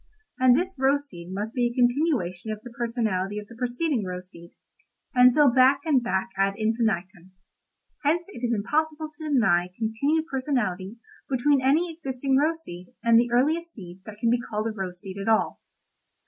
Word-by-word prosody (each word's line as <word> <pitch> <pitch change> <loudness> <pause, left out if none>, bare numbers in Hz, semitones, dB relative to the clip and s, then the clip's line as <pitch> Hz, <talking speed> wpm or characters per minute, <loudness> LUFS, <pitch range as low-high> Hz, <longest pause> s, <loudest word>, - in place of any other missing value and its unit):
And 255 -1 +6
this 365 +4 -2
rose 280 +2 +2
seed 175 -1 -10
must 210 +4 -4
be 245 -2 +1
a 240 - -6
continuation 245 - +1
of 215 - -5
the 245 - -10
personality 220 -5 -2
of 210 - -5
the 230 - -14
preceding 250 +1 -1
rose 180 0 -6
seed—and 250 +8 -1
so 295 +3 +5
back 260 +2 +5
and 285 -5 +3
back 235 -2 -1
ad 195 0 +1
infinitum. 195 -5 -1 0.7
Hence 330 +4 +1
it 255 -11 -10
is 240 - +1
impossible 305 +8 -1
to 310 0 -6
deny 180 -11 +3
continued 280 +9 0
personality 240 - -2 0.3
between 275 +1 +2
any 315 +6 +2
existing 270 -4 -2
rose 320 +4 +1
seed 175 - -9 0.2
and 230 0 +6
the 240 0 +1
earliest 320 +7 +1
seed 180 -3 -10
that 210 -1 -9
can 230 0 +2
be 240 0 +2
called 215 -2 -4
a 225 - -1
rose 185 -4 -5
seed 190 +1 -7
at 195 - -5
all. 220 - +1
240 Hz, 175 wpm, -25 LUFS, 200-280 Hz, 0.7 s, And